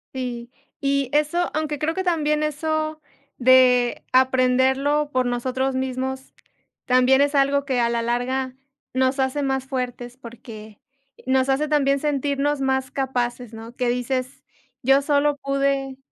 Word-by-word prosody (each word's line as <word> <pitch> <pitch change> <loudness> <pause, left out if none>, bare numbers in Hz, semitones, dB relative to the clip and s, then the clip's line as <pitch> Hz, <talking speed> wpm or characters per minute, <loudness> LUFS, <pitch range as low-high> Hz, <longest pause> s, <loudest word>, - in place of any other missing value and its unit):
Sí. 245 -2 -5 0.3
Y 275 -2 0
eso 300 +4 +1
aunque 305 -1 -2
creo 310 +3 -1
que 375 +1 -3
también 300 -3 +1
eso 310 +1 -2 0.4
de 250 -1 +4
aprenderlo 260 +3 +2
por 255 0 +1
nosotros 255 +2 -1
mismos, 260 0 -4 0.5
también 255 +1 +4
es 285 +1 +2
algo 280 0 +2
que 260 -3 0
a 235 - +2
la 235 0 -1
larga 255 +2 -2 0.4
nos 260 +1 +1
hace 265 +2 0
más 265 -1 -1
fuertes, 245 -2 -4
porque 225 -4 -12 0.5
nos 260 +1 +1
hace 290 +3 +1
también 280 -2 +2
sentirnos 285 0 -1
más 265 -1 0
capaces, 245 -3 -3
¿no? 225 +2 -10
Que 250 -1 0
dices: 255 +1 -2 0.4
"Yo 270 +2 +4
solo 290 0 +2
pude". 275 -1 -1
265 Hz, 140 wpm, -22 LUFS, 250-285 Hz, 0.5 s, de